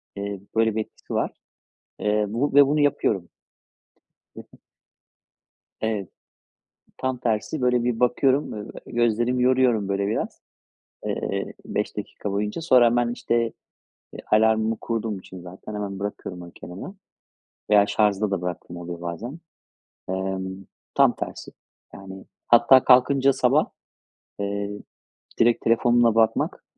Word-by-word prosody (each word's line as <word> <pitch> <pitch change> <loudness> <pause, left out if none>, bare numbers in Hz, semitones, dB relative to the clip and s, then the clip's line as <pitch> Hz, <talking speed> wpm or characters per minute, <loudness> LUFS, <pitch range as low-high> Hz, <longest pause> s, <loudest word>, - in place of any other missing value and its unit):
eee, 100 0 -4 0.2
böyle 110 -1 +2
bir 110 - +1
etkisi - - -10
var. - - 0 0.7
Eee, 105 0 +1
bu 125 +7 -1
ve 140 0 +7
bunu 150 +2 +1
yapıyorum. 130 -10 +1 1.1
Hı - - -7
hı. - - -17 1.2
Evet. 105 -4 -2 0.9
Tam 130 -1 -2
tersi, 120 +5 -1
böyle 125 -1 +2
bir 120 -2 -1
bakıyorum. 130 +3 +2
Ö 105 -1 -6
eee, - - -12
gözlerimi 120 +2 +1
yoruyorum 125 -5 +3
böyle 100 0 0
biraz, 105 - -3 0.7
eee, - - -3
5 - - -3
dakika 100 - -5
boyunca. 105 +8 -2
Sonra 130 -7 +5
hemen 120 0 +2
işte, 115 -1 0 0.6
eee, - - -8
alarmımı 110 +1 +3
kurduğum 110 -3 -2
için 95 -1 -11
zaten 95 +4 -10
hemen 100 -2 -4
bırakıyorum 100 -3 -5
onu 85 -1 -11
kenara. 90 - -9 0.8
Veya 105 -1 +5
şarjda 105 0 +1
da 95 -3 -1
bıraktığım 90 -1 -5
oluyor 85 0 -7
bazen. 105 - -6 0.7
Emm, 95 0 -3 0.3
tam - - +5
tersi. - - -6 0.4
Yani 95 0 -10 0.2
hatta 120 +2 +6
kalkınca 135 +1 +5
sabah, - - +3 0.7
eee, 100 0 -2 0.7
direkt 120 0 +3
telefonuma 120 0 +4
bakmak 115 -1 +1
110 Hz, 130 wpm, -24 LUFS, 100-120 Hz, 1.2 s, ve